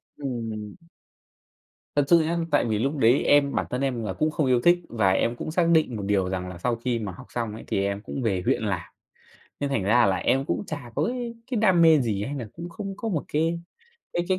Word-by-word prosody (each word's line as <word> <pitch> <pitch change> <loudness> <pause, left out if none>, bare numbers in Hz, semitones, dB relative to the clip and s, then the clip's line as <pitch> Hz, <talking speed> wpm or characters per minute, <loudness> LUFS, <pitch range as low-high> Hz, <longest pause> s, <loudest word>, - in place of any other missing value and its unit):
Ừm. 115 -6 -5 1.2
Thật 145 - +4
sự 170 +3 +6
nhá, 170 +2 -1
tại 145 - +3
vì 110 -2 0
lúc 140 +5 -1
đấy 125 +1 +4
em 145 -1 +4
bản - - 0
thân 125 +2 -2
em 125 -4 -1
là 95 - -3
cũng 155 +10 0
không 155 -2 0
yêu 125 -2 +3
thích 175 +4 +5
và 105 -5 +2
em 115 +5 +1
cũng 155 - -5
xác 170 0 +2
định 160 -8 +3
một 100 - -4
điều 100 -2 +1
rằng 90 -1 -3
là 90 - -8
sau 120 +7 0
khi 120 0 -2
mà 105 -4 -4
học 90 - -12
xong 115 -3 -3
ấy, 110 - -8
thì 100 - 0
em 100 +1 -2
cũng 135 - -5
về 100 -6 0
huyện - - +1
làm. 95 -5 -2 0.7
Nên 145 - -1
thành 115 -8 0
ra 115 +4 +4
là 95 -1 +2
em 135 +8 +1
cũng - - -1
chả 125 -7 -7
có 145 - +1
cái 240 -1 -3 0.2
cái 245 - +1
đam 190 -6 +4
mê 160 -2 +7
gì 105 -4 -1
hay 140 - -4
nà 125 -6 -5
cũng 170 +1 -7
không 195 +2 -6
có 225 - -3
một 160 -7 -1
cái 165 +3 +1 0.5
cái 175 - 0
cái 185 -1 +2
125 Hz, 250 wpm, -25 LUFS, 105-155 Hz, 1.2 s, mê